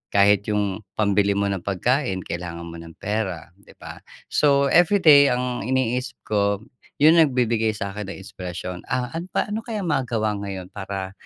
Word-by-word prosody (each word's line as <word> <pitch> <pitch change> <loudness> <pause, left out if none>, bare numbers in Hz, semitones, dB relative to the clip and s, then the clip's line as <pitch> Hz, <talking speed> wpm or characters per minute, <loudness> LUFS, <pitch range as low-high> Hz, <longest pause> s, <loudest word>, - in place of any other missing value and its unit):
Kahit 100 0 +4
yung 105 -1 -2
pambili 100 -1 +2
mo 100 0 0
ng 95 - -2
pagkain, 100 +1 0
kailangan 85 0 -6
mo 85 0 -8
ng 85 -1 -12
pera, 95 -6 -3
‘di - - -19
ba? - - -10 0.3
So, 140 -1 +3
everyday 160 -5 +6
ang 125 -3 -1
iniisip 130 0 -1
ko 100 0 0 0.3
yung 160 +3 +6
nagbibigay 120 -7 +2
sa'kin 100 0 -5
ng 100 - -7
inspirasyon. 90 -1 -6
"Ah, 125 -1 -2
an 170 +3 -5
pa - - 0
ano 215 - -1
kaya 220 -3 -5
magawa 120 -9 0
ngayon 95 -2 -6
para, 95 -1 -5
105 Hz, 160 wpm, -23 LUFS, 95-130 Hz, 0.3 s, everyday